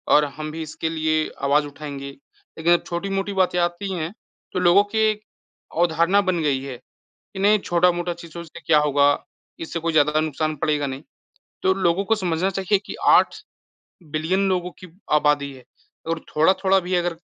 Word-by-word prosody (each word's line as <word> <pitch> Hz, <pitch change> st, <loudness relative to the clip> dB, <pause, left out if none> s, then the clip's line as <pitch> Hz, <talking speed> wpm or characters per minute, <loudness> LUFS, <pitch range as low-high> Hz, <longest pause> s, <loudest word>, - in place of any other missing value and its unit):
और 150 Hz, 0 st, +5 dB
हम 155 Hz, 0 st, -5 dB
भी 160 Hz, +1 st, -6 dB
इसके 160 Hz, +1 st, -4 dB
लिए 155 Hz, -1 st, 0 dB
आवाज़ 145 Hz, +2 st, +3 dB
उठाएँगे। 140 Hz, -1 st, -7 dB
लेकिन 160 Hz, +4 st, -5 dB
जब -, -, -3 dB
छोटी-मोटी 195 Hz, +3 st, -3 dB
बातें 185 Hz, -2 st, +1 dB
आती 175 Hz, +3 st, -1 dB
हैं, 170 Hz, +2 st, -4 dB, 0.4 s
तो 185 Hz, -, 0 dB
लोगों 180 Hz, +3 st, +5 dB
की 205 Hz, +2 st, -5 dB
एक 215 Hz, 0 st, -3 dB, 0.6 s
अवधारणा 170 Hz, +3 st, +3 dB
बन 185 Hz, -3 st, 0 dB
गई 140 Hz, -3 st, +1 dB
है 130 Hz, -3 st, -6 dB
कि 125 Hz, -, -36 dB, 0.4 s
नहीं 210 Hz, +1 st, +4 dB
छोटा-मोटा 175 Hz, -1 st, +1 dB
चीज़ों 170 Hz, 0 st, -9 dB
से 165 Hz, -, -12 dB
क्या 155 Hz, -2 st, +5 dB
होगा, 145 Hz, -1 st, +3 dB, 0.5 s
इससे 165 Hz, +1 st, -4 dB
कोई 165 Hz, +1 st, -1 dB
ज़्यादा 150 Hz, 0 st, +3 dB
नुकसान 155 Hz, 0 st, -1 dB
पड़ेगा 145 Hz, 0 st, 0 dB
नहीं। 135 Hz, +3 st, -6 dB, 0.6 s
तो 190 Hz, -, +4 dB
लोगों 185 Hz, 0 st, +1 dB
को 225 Hz, -, +2 dB
समझना 185 Hz, -2 st, -1 dB
चाहिए 195 Hz, +1 st, +1 dB
कि -, -, -6 dB
8 -, -, +5 dB, 0.8 s
बिलियन 185 Hz, +6 st, +1 dB
लोगों 180 Hz, -1 st, -1 dB
की 185 Hz, -, -11 dB, 0.3 s
आबादी 145 Hz, -2 st, +2 dB
है 130 Hz, -2 st, -14 dB, 0.4 s
और 165 Hz, -1 st, -1 dB, 0.2 s
थोड़ा-थोड़ा 190 Hz, +4 st, +4 dB
भी 180 Hz, +1 st, -3 dB
अगर 175 Hz, -1 st, 0 dB
170 Hz, 175 wpm, -22 LUFS, 150-185 Hz, 0.8 s, और